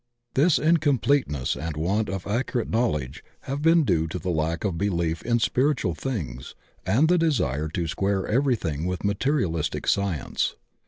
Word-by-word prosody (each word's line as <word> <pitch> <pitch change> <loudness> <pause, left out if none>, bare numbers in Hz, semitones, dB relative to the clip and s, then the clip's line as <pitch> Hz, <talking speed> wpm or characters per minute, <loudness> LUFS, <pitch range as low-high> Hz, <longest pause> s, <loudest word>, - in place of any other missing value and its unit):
This 150 +4 +4
incompleteness 145 - +2
and 80 -1 -5
want 100 +7 0
of 95 -2 -4
ac 115 +6 0
curate 120 -4 -2
knowledge 75 - -1 0.2
have 140 +2 -4
been 165 +1 +5
due 80 - +1
to 80 - -4
the 90 0 -3
lack 80 +1 -1
of 100 -5 -1
belief 85 -3 -1
in 120 -1 +1
spiritual 125 - +1
things 80 - -5 0.3
and 120 +12 +4
the 180 +1 +3
desire 80 - +1
to 85 +2 -3
square 95 +4 0
everything 105 - 0
with 90 +2 -3
materialistic 100 - 0
science. 100 -8 0
100 Hz, 155 wpm, -25 LUFS, 80-135 Hz, 0.3 s, been